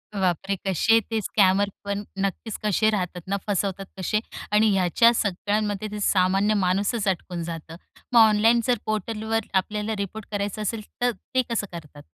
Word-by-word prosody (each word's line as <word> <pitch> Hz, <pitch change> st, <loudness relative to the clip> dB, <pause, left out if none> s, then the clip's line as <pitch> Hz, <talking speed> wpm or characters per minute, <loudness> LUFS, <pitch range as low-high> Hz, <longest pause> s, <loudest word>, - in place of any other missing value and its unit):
बापरे! 190 Hz, +1 st, 0 dB
कसे 225 Hz, +5 st, +4 dB
ते 225 Hz, -, +1 dB
स्कॅमर 200 Hz, 0 st, +3 dB, 0.2 s
पण 200 Hz, 0 st, -2 dB, 0.2 s
नक्कीच 200 Hz, +3 st, -2 dB
कसे 215 Hz, +1 st, +3 dB
राहतात 180 Hz, -4 st, -2 dB
ना, 200 Hz, +1 st, 0 dB
फसवतात 195 Hz, -1 st, -1 dB
कसे. 190 Hz, +3 st, 0 dB, 0.3 s
आणि 215 Hz, +1 st, +4 dB
ह्याच्या 195 Hz, +6 st, +4 dB
सगळ्यांमध्ये 205 Hz, 0 st, -1 dB
ते 210 Hz, -, -5 dB
सामान्य 195 Hz, +2 st, +3 dB
माणूसच 200 Hz, +4 st, 0 dB
अडकून 175 Hz, -2 st, -2 dB
जातं. 165 Hz, -1 st, -7 dB, 0.4 s
मग 235 Hz, -, +7 dB
ऑनलाईन 225 Hz, +2 st, +5 dB
जर 245 Hz, -2 st, +3 dB
पोर्टलवर 220 Hz, +1 st, -2 dB
आपल्याला 210 Hz, +3 st, 0 dB
रिपोर्ट 200 Hz, +2 st, -5 dB
करायचं 205 Hz, +1 st, -2 dB
असेल, 215 Hz, +1 st, -2 dB, 0.2 s
तर 245 Hz, 0 st, +3 dB
ते 245 Hz, +5 st, -2 dB
कसं 215 Hz, -3 st, -1 dB
करतात? 150 Hz, -3 st, -10 dB
205 Hz, 155 wpm, -24 LUFS, 190-215 Hz, 0.4 s, मग